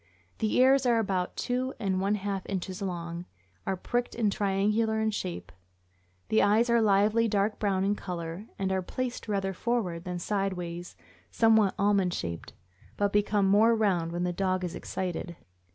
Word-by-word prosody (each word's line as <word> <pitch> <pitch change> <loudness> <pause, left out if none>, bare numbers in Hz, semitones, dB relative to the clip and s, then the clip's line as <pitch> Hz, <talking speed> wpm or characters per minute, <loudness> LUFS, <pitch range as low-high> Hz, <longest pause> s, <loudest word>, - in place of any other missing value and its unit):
The 220 - 0
ears 265 0 +5
are 235 -1 +4
about 190 -5 -1
two 255 +2 -1
and 190 -3 0
one 200 +2 +1
half 200 -2 -3
inches 190 0 -4
long, 170 -2 -4 0.4
are 190 - 0
pricked 245 +6 -2
and 220 -3 +1
triangular 210 +3 +1
in 220 0 +1
shape; 90 - -5 0.8
the 220 - +4
eyes 225 +4 +3
are 235 -1 +4
lively, 215 +2 +3
dark 205 0 0
brown 195 -3 +1
in 200 +1 +2
color, 175 -1 -5
and 190 -1 -1
are 190 0 +1
placed 250 +7 -4
rather 195 -2 -1
forward 190 -6 -1
than 180 -1 -3
sidewise 180 -2 -3 0.2
— - - -30
somewhat 220 -3 +4
almond 200 -3 +2
shaped, 85 -1 -5 0.4
but 205 -1 +1
become 205 -1 +2
more 220 +4 +5
round 185 -7 +1
when 175 +1 -2
the 180 0 -1
dog 185 0 0
is 175 -1 -3
excited. 175 -1 -4
195 Hz, 170 wpm, -28 LUFS, 180-220 Hz, 0.8 s, ears